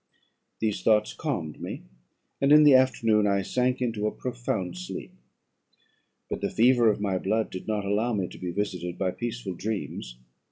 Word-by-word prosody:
"These 105 -4 -1
thoughts 105 +1 +3
calmed 85 - -4
me, - - -6 0.6
and 140 +1 +3
in 150 0 +8
the 145 -2 +7
afternoon 115 -5 +4
I 100 -1 +1
sank 125 +4 0
into 110 -3 -1
a - - 0
profound 120 -7 -3
sleep; 180 0 -7 1.1
but - - -4
the - - 0
fever 120 0 +4
of 105 - 0
my 100 -2 0
blood 110 +4 0
did 95 - -7
not 105 -2 -1
allow 105 +4 +1
me 100 -5 -1
to - - -12
be 90 - -4
visited 90 -2 -3
by 95 -2 0
peaceful 120 -2 -4
dreams. 95 - -5
105 Hz, 170 wpm, -27 LUFS, 95-120 Hz, 1.1 s, in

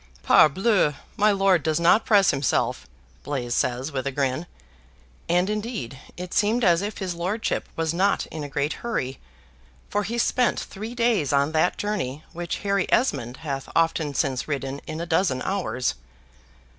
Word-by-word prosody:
"Parbleu! 185 0 +4 0.2
my 210 +1 +4
lord 195 -3 +3
does 155 +1 0
not 175 +6 +4
press 205 -6 +5
himself," 135 - 0 0.3
Blaise 125 -4 -3
says, 130 +4 -1
with 135 -1 -3
a - - -1
grin; 135 +4 -1 0.8
and, 180 +2 +3
indeed, 210 - -4 0.2
it 180 0 -6
seemed 220 +4 +2
as 175 -3 +4
if 205 +1 -4
his 185 -3 -3
lordship 185 +6 -2
was 165 0 -1
not 195 +4 +2
in 155 -2 -5
a 145 - -6
great 140 +2 -1
hurry, 135 - -3 0.7
for 205 - +1
he 225 +4 -3
spent 245 +1 +2
three 220 +4 -7
days 230 - +2
on 140 +1 +2
that 160 +3 +2
journey 170 -9 -3
which 170 0 -3
Harry 200 -1 +1
Esmond 125 - +1
hath 135 -2 -4
often 165 -3 +1
since 130 -1 0
ridden 140 -2 -3
in 155 +1 -5
a 170 - -3
dozen 165 -5 +1
hours. 185 -10 -1
170 Hz, 160 wpm, -24 LUFS, 140-200 Hz, 0.8 s, press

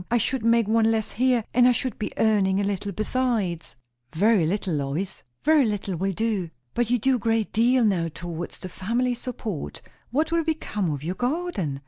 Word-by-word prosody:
I 240 - +3
should 245 +1 0
make 230 -1 +3
one 225 0 +3
less 220 -1 0
here, 245 -2 +2
and 245 0 +6
I 250 - +5
should 255 +1 -3
be 215 - -3
earning 200 -3 +3
a - - +1
little 200 0 -2
besides." 215 - -1 0.4
"Very 200 -2 +4
little, 190 0 -1
Lois!" 150 +6 -2 0.2
"Very 310 -1 +5
little 205 -4 -2
will 190 +4 -1
do." 210 -4 -1 0.2
"But 240 -1 0
you 245 - +3
do 260 +3 +2
a - - -8
great 225 0 0
deal 240 +2 +4
now 180 -5 +1
towards 170 +1 -6
the - - -7
family 235 +8 -1
support. 230 - -5 0.3
What 305 +6 0
will 335 0 +2
become 300 - -2
of 145 -2 -3
your 170 +3 -2
garden?" 245 - -2
220 Hz, 190 wpm, -25 LUFS, 185-245 Hz, 0.4 s, and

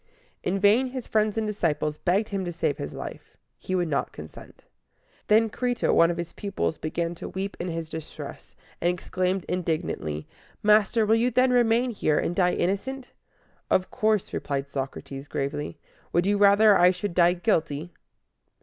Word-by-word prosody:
In 190 - -1
vain 210 +6 +4
his 255 -1 -6
friends 215 0 +1
and 220 - 0
disciples 155 -7 -1
begged 195 +4 +1
him 195 -2 -2
to 175 - -3
save 160 -3 -1
his - - -5
life: - - -8 0.2
he 185 - -3
would 175 -2 +1
not 145 -3 -1
consent. - - -12 0.6
Then 220 +2 +5
Cri´to, 245 +2 0
one 170 - +5
of 170 - -2
his 170 -1 -5
pupils, 195 -6 -3
began 170 +2 -2
to 170 - -8
weep, 195 +1 -4
in 175 - -3
his 165 -2 -4
distress, 160 -1 -9 0.3
and 175 - +3
exclaimed 185 +1 -2
indignantly, 160 - -2 0.4
"Master, 215 +1 +4
will 215 - +3
you 230 +2 +3
then 255 0 +3
remain 240 +1 +3
here, 155 -8 +1
and 175 - -1
die 180 -1 +3
innocent?" 250 +8 -2 0.6
"Of 185 - +1
course," 215 -2 0
replied 140 -1 -2
Socrates, 135 0 -6
gravely. 145 +3 -3 0.4
"Would 175 +1 +3
you 205 +1 +2
rather 205 +1 +6
I 180 -1 +6
should 180 +1 -2
die 175 0 +5
guilty?" 170 -4 -1
185 Hz, 165 wpm, -26 LUFS, 165-215 Hz, 0.6 s, rather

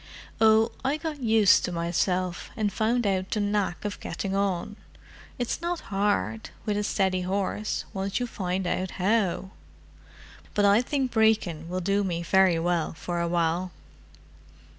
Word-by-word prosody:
"Oh—I 225 +6 +3
got 310 -2 -5
used 220 -4 +5
to - - -3
myself, 175 +1 -1
and 210 -2 0
found 230 +2 +1
out 190 -1 0
the 215 - -1
knack 205 -3 -1
of 205 - -3
getting 195 -1 -4
on. 195 0 -1 0.6
It's 245 +5 -2
not 345 0 -2
hard, 110 - 0 0.2
with 210 - 0
a 210 - 0
steady 190 -3 +1
horse, 195 +3 -2
once 195 +2 -2
you 245 - -1
find 190 -5 -3
out 185 +1 -1
how. 190 -1 +1 1.0
But 205 - +3
I 200 +3 +5
think 265 0 -1
Brecon 210 -8 +2
will 185 +1 -2
do 200 +3 +1
me 170 -3 -2
very 190 0 +4
well 170 -1 0
for 175 +1 -3
awhile." 170 +1 0
195 Hz, 145 wpm, -27 LUFS, 180-220 Hz, 1.0 s, used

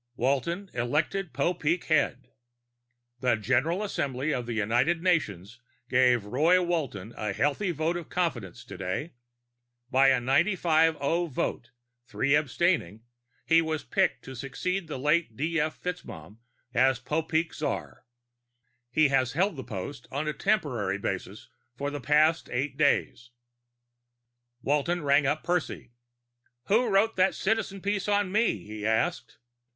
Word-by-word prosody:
WALTON 155 - -1
ELECTED 155 +9 -1
POPEEK 170 +3 0
HEAD 145 -5 0 0.9
_The 125 -4 +2
General 130 - +1
Assembly 145 -6 -2
of 125 -3 -3
the 120 - -3
United 120 +11 +1
Nations 120 - 0 0.3
gave 125 -4 +3
Roy 155 - +3
Walton 145 - -2
a 105 -2 -3
healthy 150 - 0
vote 165 +1 -1
of 175 -2 -6
confidence 115 - -3
today. 95 - -4 0.8
By 135 +1 +5
a 135 - +4
95 160 +4 +3
0 165 +5 0
vote, 125 -4 -3 0.4
three 140 +2 0
abstaining, 150 - +1 0.4
he 165 0 +5
was 160 -1 -2
picked 190 -2 0
to 130 - -8
succeed 165 +8 -3
the 150 - -5
late 150 -3 +1
D. 165 +3 0
F. 150 +1 -2
FitzMaugham 105 - -7 0.4
as 130 0 +3
Popeek 160 +4 -1
czar. 150 - -4 0.9
He 155 +3 +3
has 130 -2 +1
held 185 +4 +1
the 130 - -6
post 115 +4 -7
on 145 +3 -2
a 150 - -1
temporary 135 - 0
basis 95 +1 -5 0.3
for 140 +1 -2
the 145 - -5
past 155 +2 +3
eight 135 +3 -2
days._ 140 -4 +1 1.3
Walton 150 +4 0
rang 140 0 +3
up 150 +2 0
Percy. 175 -8 -2 0.8
"Who 235 +4 +4
wrote 205 +2 +2
that 185 +1 +3
Citizen 200 -2 -1
piece 200 0 -1
on 205 -2 +1
me?" 210 - +1
he 105 0 -7
asked. 110 +11 -1
150 Hz, 135 wpm, -28 LUFS, 125-170 Hz, 1.3 s, By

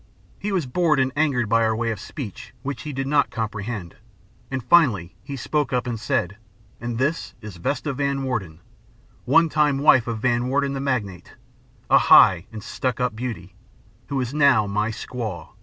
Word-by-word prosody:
He 205 - -3
was 185 -6 0
bored 155 +2 +1
and 130 0 +1
angered 140 -7 +1
by 115 +2 +3
our 110 0 +1
way 115 0 -1
of 110 - -5
speech 115 - -8
which 135 -3 -4
he 150 - -6
did 135 -1 -3
not 145 +1 +2
comprehend, 105 -4 -5 0.5
and 130 -2 -3
finally 120 - +3
he 140 +1 -7
spoke 145 +3 -1
up 125 -1 0
and 120 -3 -3
said: 100 -3 -1 0.4
'And 120 0 -4
this 140 +7 -1
is 105 -4 -9
Vesta 140 - -2
Van 140 0 -1
Warden, 95 -11 -4 0.6
one 165 +6 +5
time 150 -3 +2
wife 135 -4 +5
of 115 -1 -2
Van 120 +1 0
Warden 140 +1 0
the 135 - -3
Magnate 105 -10 -3 0.5
a - - +6
high 90 -1 +6
and 110 -2 -8
stuck 125 +2 -3
up 125 -3 0
beauty, 110 -7 -6 0.5
who 140 - -2
is 125 0 -3
now 140 -7 +4
my 105 +2 -1
squaw. 110 -7 -6
125 Hz, 180 wpm, -23 LUFS, 110-140 Hz, 0.6 s, a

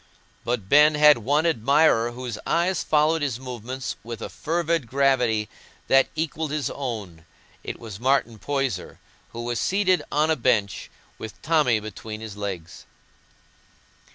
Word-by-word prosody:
But 115 -4 -2
Ben 150 +5 +6
had 150 -3 +6
one 145 +8 +1
admirer 135 -4 +3
whose 125 -3 -6
eyes 175 +2 +1
followed 155 +1 +2
his 135 -5 -2
movements 125 0 -6
with 115 0 -7
a - - -5
fervid 165 -4 -1
gravity 125 -5 +2 0.4
that 135 0 +5
equalled 160 0 -2
his 145 -3 -2
own. 105 - -6 0.4
It - - -6
was 110 -4 -9
Martin 125 -3 +1
Poyser, 135 -4 -3 0.3
who 115 - -7
was 120 0 -2
seated 185 -2 +2
on 155 +2 +2
a - - +3
bench, 110 - 0 0.3
with 110 - -8
Tommy 150 -8 +3
between 110 0 -8
his 110 -2 -8
legs. 90 -4 -6
130 Hz, 140 wpm, -24 LUFS, 110-150 Hz, 0.4 s, Ben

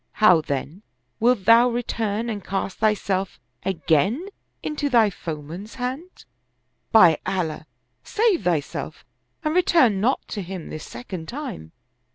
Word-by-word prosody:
How, 180 -7 +5
then, 145 +5 -4 0.4
wilt 235 -4 +2
thou 230 +3 +7
return 230 -2 -2
and 210 -4 -4
cast 195 0 -3
thyself 200 -3 0 0.2
again 190 - +1 0.3
into 295 -1 -2
thine 230 -5 +4
foeman's 165 +5 -7
hand? 265 +8 -5 0.7
By 180 -9 +7
Allah, 160 -5 -3 0.4
save 435 -5 +1
thyself 160 -5 -2 0.4
and 305 -1 0
return 325 - +4
not 255 +5 +1
to 205 - -4
him 185 -2 -7
this 155 - -7
second 160 +8 -8
time. 240 - -6
205 Hz, 125 wpm, -23 LUFS, 170-245 Hz, 0.7 s, thou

